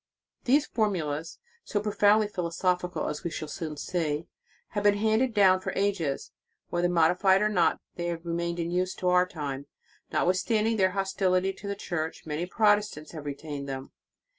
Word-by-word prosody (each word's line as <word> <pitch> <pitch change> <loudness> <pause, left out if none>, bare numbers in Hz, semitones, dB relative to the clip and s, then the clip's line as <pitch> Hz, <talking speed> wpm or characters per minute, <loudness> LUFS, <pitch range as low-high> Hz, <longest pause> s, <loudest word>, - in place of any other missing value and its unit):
]" - - -53
These 285 +4 +4
formulas, 165 - -1 0.3
so 205 - -1
profoundly 210 0 +3
philosophi 180 -1 -1
cal, - - -2
as 150 - -4
we 170 - -1
shall 155 - -5
soon 155 0 -5
see, 160 -1 -2 0.4
have 205 - -2
been 205 0 +4
handed 220 +4 +2
down 195 -3 +5
for - - -3
ages. 190 -8 -1 0.4
Whether 175 0 +1
modified 180 +4 +4
or 215 - +3
not, 210 - +2 0.2
they 175 0 -2
have 170 0 -4
remained 170 0 -2
in 170 0 -2
use 185 +1 0
to 180 - 0
our 180 0 +4
time. 140 -5 -5 0.4
Not - - +1
withstanding 215 +5 +1
their 190 -2 +3
hostility 190 -1 +1
to 195 +1 -9
the 200 - -2
Church, 165 -5 -4
many 160 +3 -3
Protestants 210 -6 +1
have 155 -3 -8
retained 145 -1 -5
them. 135 0 -6
180 Hz, 175 wpm, -28 LUFS, 160-205 Hz, 0.4 s, down